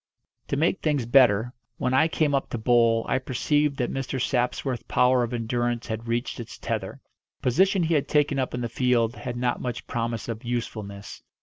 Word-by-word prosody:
To 140 - -1
make 165 +6 +1
things 145 -6 0
better, 120 -2 +4 0.2
when 125 - -1
I 135 +5 +5
came 155 -3 0
up 135 - 0
to - - -3
bowl 115 0 +3
I - - +1
perceived 145 +3 0
that 125 - -1
Mr. 135 0 -3
Sapsworth's 125 0 -1
power 125 0 +3
of 120 0 -1
endurance 120 0 -1
had 110 0 -5
reached 120 +2 -2
its 115 - -8
tether. - - -4 0.4
The - - -41
position 190 - +3
he 165 +1 +1
had 145 -3 +1
taken 145 -2 +2
up 130 -1 -2
in 125 - -3
the 120 - -1
field 120 0 +1
had 125 -3 -5
not 120 0 -1
much 125 -1 -4
promise 115 -2 -3
of 115 +1 -5
usefulness. 110 -4 -5
125 Hz, 195 wpm, -25 LUFS, 115-135 Hz, 0.4 s, I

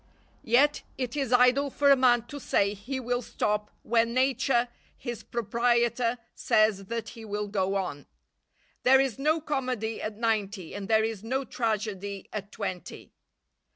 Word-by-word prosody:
Yet 275 +6 +3 0.2
it 255 -1 -3
is 275 -4 -1
idle 250 +3 +4
for 280 +1 +3
a - - +8
man 245 -3 +3
to 285 +4 -8
say 200 -6 +1
he 250 +7 -5
will 245 0 -1
stop 210 -2 -1
when 230 +1 +1
Nature, 255 -1 +2 0.3
his 240 -4 -6
proprietor, 235 +1 +1 0.2
says 215 -4 +2
that 230 +1 -4
he 225 - -11
will 210 -1 -3
go 195 -1 -1
on. 165 -8 -3 0.7
There 265 +1 +6
is 270 -2 0
no 310 +3 +2
comedy 255 -7 -2
at 215 -1 -4
ninety, 210 -5 -1
and 200 -1 -5
there 220 0 +4
is 220 -2 -3
no 265 +4 -1
tragedy 205 -5 -3
at 205 -1 -5
twenty. 185 -4 -6
230 Hz, 155 wpm, -28 LUFS, 210-255 Hz, 0.7 s, a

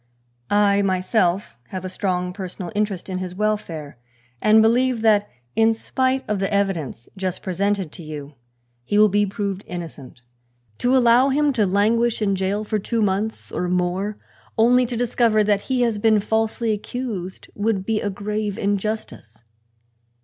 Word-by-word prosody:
I 205 -1 +4
myself 185 0 +1
have 185 -1 -6
a - - -1
strong 180 -1 -2
personal 185 -1 -6
interest 205 -3 -1
in 185 -1 -3
his 185 -1 -5
welfare 175 - -2 0.4
and 215 +1 +6
believe 235 +1 +3
that 210 -2 +4 0.3
in 225 0 +4
spite 260 +3 -1
of 210 -2 -1
the 195 +2 -1
evidence 190 - -1
just 190 -2 -3
presented 195 -2 -1
to - - -9
you 150 -2 -8 0.5
he 205 +12 0
will 210 0 +6
be 205 +1 +2
proved 200 -1 -3
innocent. 150 -8 -8 0.6
To 250 +2 +3
allow 245 +2 +5
him 290 +1 +2
to 215 -5 +2
languish 220 +5 +2
in 200 -2 +1
jail 190 +3 -1
for 215 0 -1
two 225 +2 -1
months 205 +3 -2
or 180 - -2
more, 180 +3 -1 0.4
only 245 +2 +4
to 240 -1 -4
discover 230 -2 +2
that 205 -1 +2
he 255 -1 +1
has 230 -3 +1
been 215 0 +4
falsely 220 +2 0
accused, 210 -4 -5
would 205 -2 -1
be 220 0 0
a 205 - -1
grave 205 +1 -3
injustice. 200 - -3
205 Hz, 155 wpm, -22 LUFS, 185-225 Hz, 0.6 s, and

